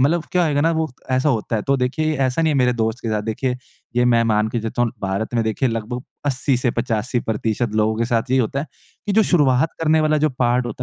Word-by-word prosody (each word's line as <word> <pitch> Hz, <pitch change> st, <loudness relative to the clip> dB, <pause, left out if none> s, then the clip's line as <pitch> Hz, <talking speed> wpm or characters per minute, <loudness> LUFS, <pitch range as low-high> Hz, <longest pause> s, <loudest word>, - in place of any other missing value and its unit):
मतलब 160 Hz, +5 st, +2 dB
क्या 180 Hz, -, +3 dB
होएगा 145 Hz, -3 st, +1 dB
ना 165 Hz, -, +3 dB
वो 160 Hz, 0 st, 0 dB, 0.2 s
ऐसा 130 Hz, +3 st, +2 dB
होता 115 Hz, -3 st, 0 dB
है। 105 Hz, -, -2 dB
तो 140 Hz, -, +3 dB
देखिए 155 Hz, +5 st, 0 dB
ऐसा 135 Hz, +3 st, +1 dB
नहीं 160 Hz, -1 st, +2 dB
है 140 Hz, -, +1 dB
मेरे 125 Hz, -1 st, +3 dB
दोस्त 110 Hz, 0 st, -1 dB
के 115 Hz, -, -3 dB
साथ 105 Hz, -1 st, -1 dB
देखिए 125 Hz, +3 st, -2 dB, 0.4 s
ये 125 Hz, -, +4 dB
मैं 120 Hz, -1 st, +4 dB
मान 110 Hz, -1 st, +2 dB
के 115 Hz, 0 st, -2 dB
चलता 115 Hz, +2 st, -2 dB
हूँ 120 Hz, -, +1 dB
भारत 100 Hz, +5 st, -2 dB
में 115 Hz, -, +2 dB
देखिए 110 Hz, +4 st, 0 dB
लगभग 115 Hz, +2 st, -4 dB, 0.2 s
80-85 125 Hz, -3 st, 0 dB
प्रतिशत 110 Hz, +1 st, -1 dB
लोगों 110 Hz, 0 st, +1 dB
के 115 Hz, -, 0 dB
साथ 120 Hz, +1 st, -1 dB
यही 130 Hz, -, +3 dB
होता 130 Hz, +4 st, -1 dB
है 155 Hz, -, -5 dB, 0.4 s
कि 205 Hz, -, 0 dB
जो 220 Hz, +2 st, +5 dB
शुरुआत 145 Hz, -5 st, +2 dB
करने 160 Hz, 0 st, +3 dB
वाला 155 Hz, 0 st, +2 dB
जो 155 Hz, +1 st, +2 dB
पार्ट 120 Hz, 0 st, +2 dB
होता 120 Hz, +1 st, -5 dB
125 Hz, 245 wpm, -21 LUFS, 115-145 Hz, 0.4 s, जो